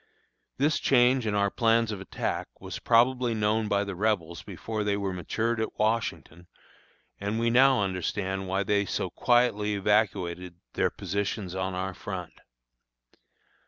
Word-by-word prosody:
This 145 +3 +2
change 125 -2 +3
in 105 - 0
our 100 -1 +2
plans 115 -1 +2
of 100 -3 -5
attack 95 - -3
was - - -7
probably 120 0 +3
known 110 +1 +1
by 100 -1 +1
the 100 -1 -5
Rebels 90 -4 -1
before 110 -2 -4
they 100 -1 0
were 100 -2 -2
matured 110 +6 -1
at 110 - -4
Washington, 110 -6 -2 0.7
and 100 +3 -2
we 115 0 +2
now 130 -2 +5
understand 95 +1 -2
why 95 +2 0
they 100 +1 +2
so - - -2
quietly 110 -4 +2
evacuated 95 -4 0 0.2
their - - +1
positions 100 0 -3
on 95 0 -2
our 95 +1 -3
front. 90 -3 -6
105 Hz, 145 wpm, -27 LUFS, 95-115 Hz, 0.7 s, now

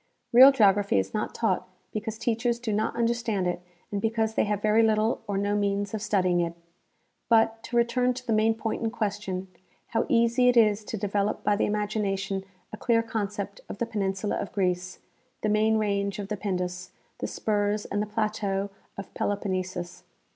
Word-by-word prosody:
Real 260 +3 +10
geography 205 - +3
is 95 0 -1
not - - -2
taught - - 0 0.3
because 220 +1 -4
teachers 235 +1 0
do 235 -3 -3
not 215 +1 0
understand 230 -4 0
it 175 0 -1 0.3
and 200 -1 -2
because 220 0 0
they - - +2
have 210 -1 -1
very 215 +2 +3
little 220 0 +2
or 200 -1 -1
no 205 +1 0
means 205 0 0
of 215 - -3
studying 185 -5 +2
it. 170 -1 -1 0.7
But, 225 -1 +3
to 240 - -2
return 245 +1 +2
to 250 0 -8
the 225 - 0
main 220 +1 +3
point 225 0 -3
in 225 - 0
question, 205 -4 -3 0.4
how 225 0 0
easy 235 +2 +4
it 245 - +3
is 215 -2 +4
to 220 - -4
develop 205 +1 -1
by 205 - +3
the - - +1
imagination 205 -2 -1 0.3
a - - -5
clear 230 +1 +2
concept 205 -2 -4
of - - -6
the 235 - -1
penin 200 -4 -1
sula 205 +1 -2
of 200 - -4
Greece, 185 -2 -1 0.4
the 215 - 0
main 215 +1 +3
range 200 -2 0
of 200 -1 -5
the 210 - -1
Pindus, 180 -2 -3 0.3
the - - -2
spurs 210 -1 -1
and 205 - -2
the 210 - -2
plateau 210 -2 -1 0.3
of 195 - -8
Peloponnesus. 185 -3 -3
210 Hz, 185 wpm, -27 LUFS, 200-225 Hz, 0.7 s, Real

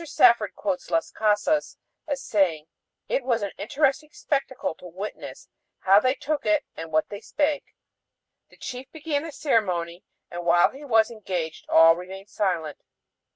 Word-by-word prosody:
Safford 235 -8 +4
quotes 275 - -3
Las 165 -1 0
Casas 215 +8 +1 0.3
as 285 -2 -3
saying: 175 -7 +1 0.4
"It 275 - 0
was 235 -4 0
an 200 - -2
interesting 280 +7 0
spectacle 275 - -2
to 180 - -10
witness 190 +5 -8 0.3
how 195 +1 +6
they 255 +4 +1
took 295 +1 -2
it 310 -2 +2
and 165 0 -7
what 155 0 +1
they 205 0 -7
spake. 295 +2 -1 0.7
The - - -20
chief 255 +1 -7
began 300 -2 -2
the 325 +1 -7
ceremony 185 - -1 0.3
and 175 0 -5
while 175 0 +4
he 275 +3 -12
was 225 -5 +3
engaged 180 -7 -5
all 165 0 +7
remained 190 +3 -9
silent 170 -7 -2
215 Hz, 155 wpm, -25 LUFS, 175-280 Hz, 0.7 s, all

